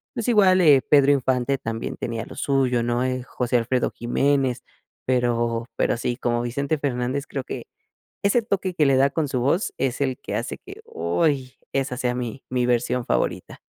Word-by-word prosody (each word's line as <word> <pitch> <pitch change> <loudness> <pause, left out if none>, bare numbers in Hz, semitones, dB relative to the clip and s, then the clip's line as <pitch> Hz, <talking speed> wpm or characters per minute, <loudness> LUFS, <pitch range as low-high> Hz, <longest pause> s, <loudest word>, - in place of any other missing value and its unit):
pues 230 - -3
igual, 190 -5 +5
eh, 145 -6 +6
Pedro 145 -1 +4
Infante 130 0 +1
también 115 0 -4
tenía 115 -1 -4
lo - - -11
suyo, 130 -4 +1
¿no?, 120 +1 0
eh, 130 0 -1
José 125 0 -1
Alfredo 120 +2 0
Jiménez, 130 +1 0 0.4
pero 120 -2 0
pero - - +1
sí, 120 0 -2
como 120 -2 0
Vicente 140 +6 -1
Fernández 135 0 -2
creo 135 - -4
que - - -6 0.6
ese 200 +4 +3
toque 190 -4 -2
que 155 - +3
le 135 - +4
da 135 +1 +4
con 155 -1 -1
su 130 - -1
voz 155 - +1
es 135 0 -1
el 130 -2 -1
que - - -5
hace - - -3
que, - - -12
¡Uy!, 130 - -1 0.2
esa 135 -2 -1
sea 125 -1 0
mi 125 +1 -5
mi 125 -1 0
versión 125 +1 +1
favorita. - - -2
130 Hz, 185 wpm, -23 LUFS, 120-140 Hz, 0.6 s, eh